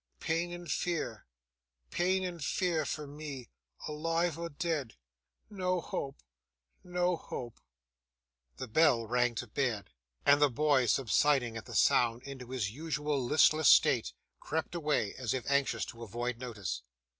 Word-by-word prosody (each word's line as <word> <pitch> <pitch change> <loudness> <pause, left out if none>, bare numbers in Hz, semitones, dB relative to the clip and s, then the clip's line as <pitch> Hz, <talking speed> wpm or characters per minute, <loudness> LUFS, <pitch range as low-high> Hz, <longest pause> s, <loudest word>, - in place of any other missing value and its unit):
Pain 165 +2 -1
and 175 0 -7
fear, 135 - -2 0.6
pain 185 +2 +1
and 175 -4 -4
fear 165 -1 0
for 150 - -3
me, 145 -4 -8 0.4
alive 165 +2 0
or 170 0 -5
dead. 145 -5 -2 0.5
No 185 -3 -1
hope, 140 -4 -5 0.6
no 180 0 0
hope!' 120 -7 -7 1.0
The - - -5
bell 125 -2 +4
rang 125 +1 +1
to 120 - -3
bed: 115 -3 -2 0.3
and 145 +1 +6
the 145 - +6
boy, 135 -1 +2
subsiding 130 0 +2
at 110 - -6
the - - -7
sound 120 0 +3
into 130 -3 -8
his 120 -6 -2
usual 150 0 -2
listless 155 +3 +5
state, 60 - +5 0.3
crept 160 +2 -3
away 150 - 0
as 125 -2 -1
if 130 - -3
anxious 140 -1 +1
to 115 - -10
avoid 120 +2 -3
notice. 100 - -4
140 Hz, 140 wpm, -32 LUFS, 120-165 Hz, 1.0 s, and